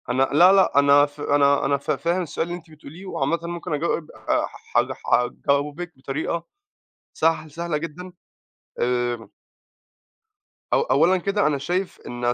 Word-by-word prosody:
أنا 130 +2 +2
لا، 175 +5 +7
لأ، 190 -7 +4
أنا 140 0 +6
ف 145 0 -12
أنا 140 -1 +3
أنا 140 +1 +2
ف 140 - -3
فاهم 170 +2 0
السؤال 165 -1 -3
اللي 175 0 -4
أنتِ 165 -2 -17
بتقوليه، 155 +4 -12
وعامةً 170 -2 -1
ممكن 170 -1 -5
أجاوب، 155 +1 -2
آآ - - -1
ح - - -13 0.4
ح - - -15
حجاوبك 145 +7 0
بطريقة 150 +5 -3 0.7
سهل 160 -1 0
سهلة 170 +1 -3
جدًا، 165 +4 -7 0.7
آمم 120 -2 -1 1.5
أو - - +4
أولًا 190 - +3
كده 200 +2 0
أنا 150 -2 +1
شايف 180 +7 -3
إن 120 0 -1
155 Hz, 150 wpm, -23 LUFS, 140-175 Hz, 1.5 s, لا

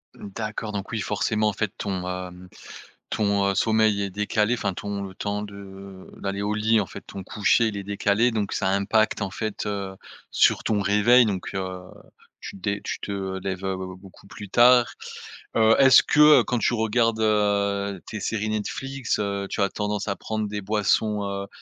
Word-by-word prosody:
D'accord, 110 +1 -5
donc 100 -1 -5
oui 115 - -2
forcément 105 +1 0
en 105 - -3
fait 105 0 -2
ton, 95 -3 -3
hem, 90 0 -6 0.6
ton, 100 -2 +1
heu, 100 - -1
sommeil 110 -2 +2
est 100 - -4
décalé, 105 +3 0
enfin 100 -6 -2
ton 100 -1 -5
temps 105 0 -3
de 100 -2 -10
d'aller 100 0 -3
au 105 +1 -1
lit, 110 +1 +2
en 105 - 0
fait - - -10
ton 95 - -9
coucher, 105 +4 +2
il 105 - -6
est 100 - -5
décalé. 100 +4 +1
Donc 105 -3 -2
ça 95 - 0
impacte 100 +2 +1
en 95 - -4
fait, 110 +1 -4
heu, 100 -2 -4 0.3
sur - - +3
ton 105 -2 0
réveil 105 +5 +5
donc, 100 -4 -3
heu, 95 -1 -4 0.6
tu - - -8
te 95 - -17
dé 100 +2 -1
tu - - -4
te 95 -1 -4
lèves, 95 0 -4
heu, 95 0 -1 0.2
beaucoup 95 +1 -16
plus 100 0 -10
tard. 120 +1 +5 0.6
Heu, 110 0 +5
est-ce 130 -2 +7
que, 150 0 +6
heu, - - -2
quand 125 - -1
tu 120 - +1
regardes, 110 0 +1
heu, 100 -2 +1
tes 105 - -6
séries 110 0 -2
Netflix, 130 +5 -3
heu, 100 -1 -2
tu 105 - -2
as 100 - +2
tendance 105 +1 -3
à 100 - -1
prendre 110 +3 -3
des 105 0 -4
boissons, 105 +1 +1
heu, 100 0 -4
105 Hz, 190 wpm, -24 LUFS, 100-110 Hz, 0.6 s, est-ce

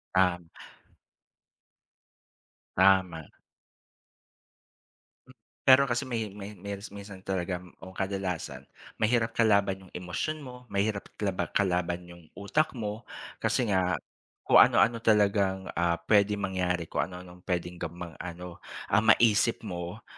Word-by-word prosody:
Um. 90 -2 +2 2.3
Tama. 95 -4 +3 2.0
Hmm. - - -15 0.3
Pero 135 +1 +7
kasi 120 -1 0
may 115 -4 -3
may 105 0 -7
mils 100 +2 -7
minsan 100 -2 -10
talaga, 90 -2 -2
ang 95 +1 -13
kadalasan 90 -9 -3 0.3
mahirap 115 +1 +2
kalaban 100 -4 +2
yung - - -22
emosyon 90 - -3
mo, 125 -1 -11
mahirap 100 -1 -1
kalaba 100 -3 -2
kalaban 90 -2 +1
yung 85 -1 -14
utak 140 +10 0
mo, 110 -1 -5 0.3
kasi 120 -5 +1
nga 90 -2 +2 0.5
kung - - +6
ano-ano 115 +3 +5
talagang, 100 -4 +2
ah, 85 0 +1
pwede 105 +2 +4
mangyari. 90 -3 -1
Kung - - -2
ano-anong 90 -1 -12
pwedeng 90 -1 -2
gamang 85 0 -6
ano, 90 0 -8 0.3
ah, 100 - +5
maisip 110 +1 +4
mo, 90 +1 -6
95 Hz, 115 wpm, -28 LUFS, 90-105 Hz, 2.3 s, Pero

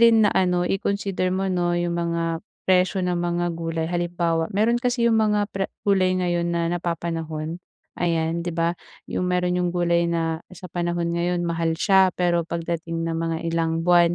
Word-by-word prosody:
rin 230 -2 +6
na - - +3
ano 180 -1 +2
i-consider 195 -1 -1
mo 190 +1 -1
'no 175 -1 +1
yung 175 0 0
mga 170 -1 -1 0.2
presyo 185 0 +2
ng 180 -1 0
mga 175 0 0
gulay 165 -1 -3
halimbawa, 170 -1 0
mayro'n 220 +4 +1
kasi 245 -1 +1
yung 225 -1 +4
mga 210 -1 +2
pre 195 0 -2 0.2
gulay 185 -2 +3
ngayon 175 -1 0
na 170 0 0
napapanahon, 165 -1 -3 0.4
ayan 165 -1 0
'di 170 -1 -4
ba? 165 +1 +2 0.4
Yung 180 - 0
mayro'n 180 0 +1
yung 180 - +1
gulay 170 -1 +2
na 165 -1 -1 0.2
sa 180 -1 -10
panahon 175 -1 -1
ngayon 175 +1 0
mahal 165 -1 0
siya 190 +1 +5
pero 170 -2 +1
pagdating 165 0 -3
ng 165 0 -2
mga 165 0 -1
ilang 165 0 0
buwan, 175 -1 +5
175 Hz, 175 wpm, -24 LUFS, 165-185 Hz, 0.4 s, rin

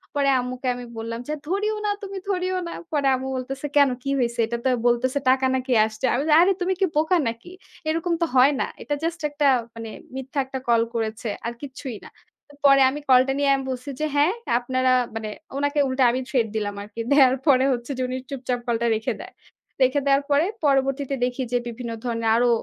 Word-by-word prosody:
পরে 280 -1 +2
আম্মুকে 250 +1 -4
আমি 245 0 -7
বললাম 230 +1 -4
যে, 305 - -2
"ধরিও 415 +5 0
না, 415 - +2
তুমি 395 0 -6
ধরিও 370 -1 0
না।" 335 - -6 0.2
পরে 290 -3 +1
আম্মু 260 +1 -5
বলতেছে, 270 +3 -5
"কেন? 280 -1 +6
কি 275 - -3
হয়েছে? 235 -1 -1
এটা 235 +1 -2
তো - - +4 0.2
বলতেছে 255 +3 +1
টাকা 260 0 +3
নাকি 260 0 -3
আসছে।" 220 +3 -4
আমি 255 +4 0
যে, 300 - +5
আরে 370 +3 +5
তুমি 370 +1 +1
কি - - +6
বোকা 315 +4 +3
নাকি? 230 +9 -6 0.4
এরকম 330 +2 0
তো - - +4
হয় 260 +3 +6
না। - - +1 0.2
এটা 295 - -3
just 330 -1 -2
একটা 290 0 -1 0.3
মানে 225 -1 -7 0.3
মিথ্যা 265 +2 -4
একটা 265 0 -5
call 230 -1 +4
করেছে। 225 0 -3 0.2
আর 235 - -2
কিচ্ছুই 265 -3 -7
না। - - -11 0.6
পরে 275 -1 +7
আমি 290 +3 -4
call 255 -1 +8
টা 270 - +1
নিয়ে 285 -1 +2
আমি 270 - -3
বলছি 255 +2 -6
যে, 310 - 0
"হ্যাঁ, 300 +7 +4 0.3
আপনারা 255 +1 +1 0.2
মানে" 220 -1 -4 0.3
ওনাকে 285 +1 0
উল্টা 260 0 +1
আমি 255 - -1
threat 240 -5 +1
দিলাম 205 -1 -2
আরকি। 215 +2 -11
দেয়ার 265 -3 +6
পরে 265 -2 +5
হচ্ছে 240 +2 -5
যে - - -2
উনি 255 +1 -3
চুপচাপ 255 -3 -3
call 235 -2 0
টা 235 - +2
রেখে 220 +1 -2
দেয়। - - -11 0.5
রেখে 270 +3 +2
দেয়ার 275 0 +4
পরে 285 +3 +4 0.2
পরবর্তীতে 275 0 +1
দেখি 250 +1 -3
যে 245 - +3
বিভিন্ন 235 0 -6
ধরনের 230 -1 -1
আরও 240 +1 +3
260 Hz, 210 wpm, -24 LUFS, 240-285 Hz, 0.6 s, call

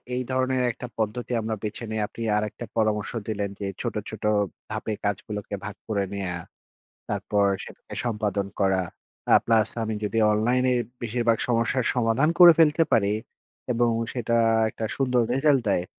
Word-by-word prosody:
এই 125 - 0
ধরনের 130 0 +1
একটা 125 +2 -8
পদ্ধতি 110 +3 -2
আমরা 110 0 -2
বেছে 105 +2 -4
নেই; 110 - -2
আপনি 115 - -10 0.2
আরেকটা 105 +3 -3
পরামর্শ 110 -2 +1 0.2
দিলেন 100 -2 -2
যে 100 - -3
ছোট, - - -3
ছোট - - -8 0.5
ধাপে 110 - -3
কাজগুলোকে 100 +1 -3
ভাগ 105 -1 -6
করে 100 -3 0
নেয়া, 95 -3 -3 0.8
তারপর 105 -1 +1 0.2
সেটাকে - - -11
সম্পাদন 105 -4 -1
করা। 95 -1 +3 0.5
আ - - +9
প্লাস 110 -2 +4
আমি 110 0 -2
যদি 105 +2 -1
অনলাইনে 125 +4 +2 0.3
বেশিরভাগ 115 0 +1
সমস্যার 120 +1 +1
সমাধান 125 +4 +2
করে 175 -1 +11
ফেলতে 160 0 +5
পারি 100 -1 +3 0.6
এবং 120 0 +2 0.2
সেটা 115 -1 0 0.3
একটা 110 - -5
সুন্দর 125 -3 +2
রেজাল্ট 135 0 +3
দেয়, 90 -3 +1
115 Hz, 150 wpm, -25 LUFS, 105-125 Hz, 0.8 s, করে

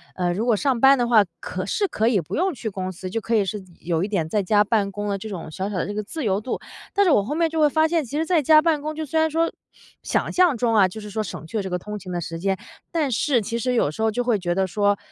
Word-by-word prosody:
呃 175 -1 0
如 210 +6 -2
果 235 -3 +3
上 255 +1 0
班 270 +1 +7
的 240 -1 +1
话， 225 -3 +6 0.2
可 185 0 -5
是 400 - 0
可 220 -8 0
以 230 -4 +3
不 160 - -5
用 370 +3 +1
去 225 -4 -4
公 185 -2 -4
司 185 +1 -7
就 225 +4 -2
可 230 +2 0
以 205 -3 +3
是 205 0 -4 0.2
有 165 0 -1
一 - - -1
点 190 -7 -1
在 205 +6 0
家 205 +2 +4
办 210 -2 0
公 205 +1 -4
的 200 -1 -1
这 215 +3 -7
种 175 -5 -6
小 190 +5 -3
小 205 - -4
的 - - 0
这 205 - -4
个 210 - -2
自 310 +9 -6
由 200 -2 +1
度。 250 - -3 0.3
但 400 0 +3
是 345 - +4
我 205 - +4
后 275 +9 -3
面 330 0 +2
就 320 - -2
会 300 - +5
发 315 +2 +3
现， 330 -1 +1
其 280 +3 -5
实 320 - 0
在 340 -2 +2
家 310 +2 +6
办 315 -3 +1
公 310 +1 -3
就 315 0 -4
虽 320 +3 0
然 320 - +2
说 330 +2 +1 0.5
想 - - -1
象 355 -7 +3
中 230 0 +1
啊， 195 -3 +6
就 220 +4 -8
是 210 - -8
说 220 - -1
省 185 - -7
去 160 - -5
了 205 - -1
这 190 - -4
个 180 - -1
通 210 +4 -6
勤 185 - -9
的 175 - -2
时 165 0 -5
间， 195 +2 0 0.3
但 315 -5 0
是 255 +2 +2
其 230 +3 -3
实 250 +1 0
有 150 - +2
时 155 - -7
候 220 - +3
就 245 +3 -1
会 240 -3 +2
觉 175 -1 -1
得 190 - +2
说 205 +2 +1
220 Hz, 340 characters per minute, -23 LUFS, 195-290 Hz, 0.5 s, 班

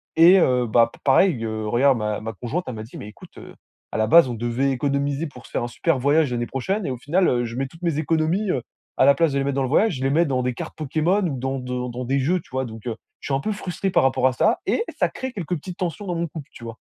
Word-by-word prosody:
Et 170 +4 +8
heu, 125 -5 +2
bah, 115 +1 +4
pa - - -16
pareil, 135 -2 +3
heu, 110 -1 -3
regarde 130 +4 +3
ma 105 -1 -2
ma 110 +1 -5
conjointe 125 - -4
elle 125 - -4
m'a 110 - -6
dit: 115 - -11
«Mais - - -8
écoute 105 - -14
heu, - - -12 0.4
à - - -3
la 110 - +2
base, 165 +3 +7
on 120 - -3
devait 120 +4 0
économiser 140 +3 -1
pour 125 -4 -13
se - - -21
faire - - -1
un - - -2
super 165 +6 0
voyage 145 +1 +2
l'année 120 -1 -1
prochaine» 190 - -2
et 135 - -2
au 125 - -4
final 170 +9 +1
heu, 120 -1 +1
je 115 +1 -6
mets 135 - -1
toutes 165 +6 -17
mes 165 -4 0
économies, 165 +6 +1
heu, 130 - -1 0.4
à 130 - +5
la 140 - +6
place 165 -3 +2
de - - 0
les - - 0
mettre 140 -1 -1
dans 135 - +1
le 130 - -2
voyage, 205 +4 +3
je 130 - -5
les 135 - +1
mets 170 +3 +3
dans 130 -3 0
des 125 0 -1
cartes - - -7
Pokémon 160 +6 +1
ou 135 -5 -4
dans 135 +1 -2
de 125 -1 -4
dans 125 +1 -5
des 135 +2 +1
jeux, 175 +7 +1
tu - - -23
vois? 130 0 -1
Donc 110 -1 -10
heu, 115 - -2 0.3
je - - -7
suis 140 - -1
un - - 0
peu 215 - -2
frustré 195 -1 -3
par - - +3
rapport 130 -1 +3
à 130 - 0
ça, - - +2
et 455 - +1 0.2
ça - - +3
crée 260 0 -5
quelques 180 -3 -3
petites 180 +4 -9
tensions 185 +3 -3
dans 175 - -2
mon 170 0 -1
couple, 150 -1 -9
tu 120 - -12
vois? 115 0 -7
135 Hz, 305 wpm, -23 LUFS, 120-165 Hz, 0.4 s, Et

